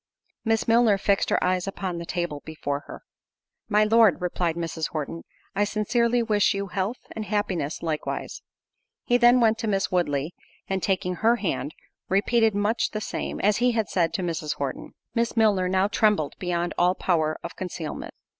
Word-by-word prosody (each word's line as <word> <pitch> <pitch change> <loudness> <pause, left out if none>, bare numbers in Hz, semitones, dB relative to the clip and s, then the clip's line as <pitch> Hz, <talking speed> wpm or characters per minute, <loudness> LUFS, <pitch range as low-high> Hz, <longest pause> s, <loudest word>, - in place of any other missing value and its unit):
Miss 225 -1 +1
Milner 225 -3 +5
fixed 195 0 +1
her - - +1
eyes 185 +1 +1
upon 190 -3 -4
the 170 - -7
table 175 -5 -3
before 145 -2 -4
her. - - -10 0.7
"My 210 0 +4
Lord," 220 -2 +5
replied 175 -2 -1
Mrs. 165 -2 -3
Horton, 155 +1 -5 0.3
"I 205 - +3
sincerely 235 +3 +1
wish 210 -3 +2
you 200 0 -3
health 195 +7 -2
and 220 - -5
happiness 190 -9 -2
likewise." 155 -2 -3 0.6
He 245 - +4
then 245 +1 +6
went 225 -1 +3
to 225 - -2
Miss 195 -2 0
Woodley, 155 -3 0 0.3
and 190 -1 -1
taking 180 -2 -1
her 230 +2 +4
hand, 185 -8 -3 0.3
repeated 220 +2 +3
much 210 +3 +1
the 215 - -4
same, - - -4
as 210 +1 +3
he 245 0 +2
had 220 -3 0
said 170 -3 +1
to 190 - -2
Mrs. 165 -3 -2
Horton. 140 -2 -5 0.2
Miss 235 0 -1
Milner 200 -5 +3
now 190 +1 +2
trembled 205 -7 +2
beyond 175 -1 -1
all 180 +1 +4
power 155 -5 0
of 170 - -7
concealment. 170 -4 -6
195 Hz, 175 wpm, -25 LUFS, 170-220 Hz, 0.7 s, then